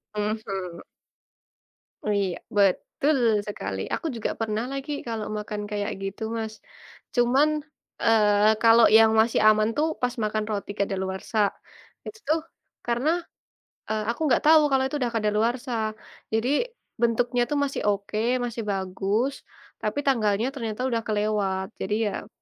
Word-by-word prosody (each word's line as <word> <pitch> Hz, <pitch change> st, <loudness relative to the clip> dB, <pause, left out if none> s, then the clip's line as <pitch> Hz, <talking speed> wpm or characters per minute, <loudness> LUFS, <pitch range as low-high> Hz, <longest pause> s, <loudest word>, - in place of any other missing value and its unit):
Mhm. 195 Hz, -4 st, -3 dB, 1.2 s
Oh, 210 Hz, -, 0 dB
iya. 195 Hz, -3 st, 0 dB, 0.2 s
Betul 235 Hz, +9 st, +2 dB, 0.3 s
sekali. 100 Hz, -, -4 dB
Aku -, -, -2 dB
juga 225 Hz, -, -2 dB
pernah 220 Hz, 0 st, -1 dB
lagi 275 Hz, +2 st, -4 dB, 0.2 s
kalau 225 Hz, -2 st, -3 dB
makan 210 Hz, 0 st, -4 dB
kayak 205 Hz, -1 st, -2 dB
gitu, 195 Hz, +3 st, -5 dB, 0.2 s
Mas. 220 Hz, -1 st, -4 dB, 0.6 s
Cuman, 255 Hz, +5 st, +4 dB, 0.5 s
eee, 210 Hz, -1 st, +5 dB
kalau 230 Hz, 0 st, +7 dB
yang 225 Hz, 0 st, +6 dB
masih 225 Hz, +1 st, +1 dB
aman 215 Hz, 0 st, +5 dB
tuh 310 Hz, +2 st, +3 dB
pas 250 Hz, -1 st, +1 dB
makan 215 Hz, 0 st, -1 dB
roti 205 Hz, -1 st, -3 dB
kadaluwarsa, 190 Hz, +2 st, -2 dB, 0.7 s
itu 445 Hz, -, -8 dB
tuh 320 Hz, -, +3 dB, 0.5 s
karena, 240 Hz, +5 st, +1 dB, 0.8 s
eee, 215 Hz, -1 st, -1 dB
aku 235 Hz, -, -5 dB
nggak 245 Hz, -, +3 dB
tahu 315 Hz, 0 st, +8 dB
kalau 265 Hz, -1 st, +3 dB
itu 270 Hz, -, -3 dB
udah 240 Hz, -2 st, 0 dB
kadaluwarsa, 225 Hz, +4 st, 0 dB, 0.6 s
jadi 225 Hz, +3 st, +1 dB, 0.5 s
bentuknya 240 Hz, +1 st, +2 dB
tuh 295 Hz, -, +1 dB
masih 275 Hz, -, -3 dB
oke, 200 Hz, +1 st, -3 dB, 0.3 s
masih 235 Hz, -1 st, -4 dB
bagus, 195 Hz, +7 st, -1 dB, 0.5 s
tapi 215 Hz, +7 st, -2 dB
tanggalnya 220 Hz, -4 st, +2 dB
ternyata 225 Hz, -4 st, -4 dB
udah 230 Hz, -2 st, 0 dB
kelewat, 205 Hz, -3 st, 0 dB
jadi 200 Hz, +2 st, -1 dB, 0.3 s
ya -, -, -17 dB
220 Hz, 135 wpm, -25 LUFS, 205-240 Hz, 1.2 s, tahu